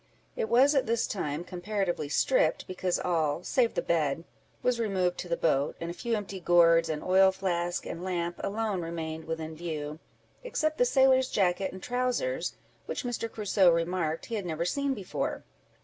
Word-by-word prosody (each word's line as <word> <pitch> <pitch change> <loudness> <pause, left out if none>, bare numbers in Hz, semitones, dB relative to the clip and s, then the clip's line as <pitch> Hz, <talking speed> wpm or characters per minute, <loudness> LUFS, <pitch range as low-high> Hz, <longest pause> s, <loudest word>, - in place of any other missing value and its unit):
It 475 -3 -2
was, 270 +5 +5
at 270 -5 +2
this 230 0 +1
time, 155 -5 -3
comparatively 180 -4 -2
stripped, - - +2
because 185 -1 -1
all, 165 -2 0
save 240 +2 +1
the - - 0
bed, 160 -2 0 0.4
was 250 -1 +1
removed 190 -5 0
to 180 - -5
the 170 - 0
boat, 140 -3 +1
and 170 0 -4
a - - -6
few 230 +6 -2
empty 200 -2 -5
gourds, 170 -1 +5
an 155 -1 -3
oil 190 +1 +5
flask, 175 -2 -2
and 170 - -6
lamp, 175 -2 -2
alone 205 -2 -1
remained 160 -1 -5
within 160 0 -4
view, 155 -2 -5 0.4
except 310 -11 -1
the 245 - +5
sailor's 260 0 +4
jacket 190 -1 +1
and 185 - -10
trowsers, 255 - -1 0.3
which - - -3
Mr. 235 -2 -3
Crusoe 205 -3 +3
remarked 165 -1 0
he - - -8
had 205 -4 -2
never 165 0 -2
seen 280 +8 0
before. 195 -5 -3
180 Hz, 175 wpm, -29 LUFS, 165-230 Hz, 0.4 s, was